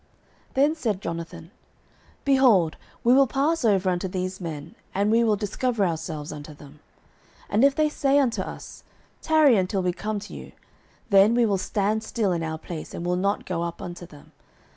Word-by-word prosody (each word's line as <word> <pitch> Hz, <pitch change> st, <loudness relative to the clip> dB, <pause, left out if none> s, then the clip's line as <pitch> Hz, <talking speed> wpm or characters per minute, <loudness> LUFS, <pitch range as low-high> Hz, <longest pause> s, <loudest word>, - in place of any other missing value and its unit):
09:014:008 -, -, -30 dB
Then 285 Hz, +4 st, +3 dB
said 225 Hz, -, -2 dB
Jonathan, 170 Hz, 0 st, -6 dB, 0.7 s
Behold, 245 Hz, -, +4 dB, 0.3 s
we 240 Hz, -, +5 dB
will 270 Hz, +1 st, +5 dB
pass 290 Hz, +5 st, 0 dB
over 200 Hz, -4 st, +2 dB
unto 180 Hz, 0 st, 0 dB
these 185 Hz, 0 st, -4 dB
men, 160 Hz, -2 st, -6 dB, 0.2 s
and 200 Hz, +2 st, +2 dB
we 230 Hz, +1 st, +4 dB
will 220 Hz, -2 st, +3 dB
discover 210 Hz, +1 st, -1 dB
ourselves 160 Hz, -3 st, -4 dB
unto 150 Hz, 0 st, -9 dB
them. 145 Hz, +1 st, -15 dB, 0.7 s
09:014:009 215 Hz, +5 st, +3 dB
If 280 Hz, 0 st, +3 dB
they 310 Hz, 0 st, +3 dB
say 280 Hz, -2 st, +1 dB
thus 285 Hz, -, +6 dB
unto 235 Hz, -3 st, -1 dB
us, -, -, -9 dB, 0.4 s
Tarry 310 Hz, -7 st, +4 dB
until 190 Hz, 0 st, 0 dB
we 180 Hz, -1 st, 0 dB
come 210 Hz, +4 st, -3 dB
to 205 Hz, -, -10 dB
you; -, -, -10 dB, 0.6 s
then 200 Hz, +4 st, +6 dB
we 240 Hz, -1 st, +4 dB
will 200 Hz, -3 st, +1 dB
stand 205 Hz, +3 st, 0 dB
still 220 Hz, -3 st, -1 dB
in 170 Hz, -2 st, -1 dB
our 160 Hz, -1 st, -3 dB
place, 160 Hz, 0 st, -8 dB
and 170 Hz, -, -5 dB
will 180 Hz, 0 st, +1 dB
not 200 Hz, +3 st, -1 dB
go 175 Hz, -2 st, -3 dB
up 170 Hz, 0 st, -4 dB
unto 175 Hz, 0 st, -8 dB
them. 150 Hz, -4 st, -16 dB
195 Hz, 190 wpm, -25 LUFS, 170-235 Hz, 0.7 s, thus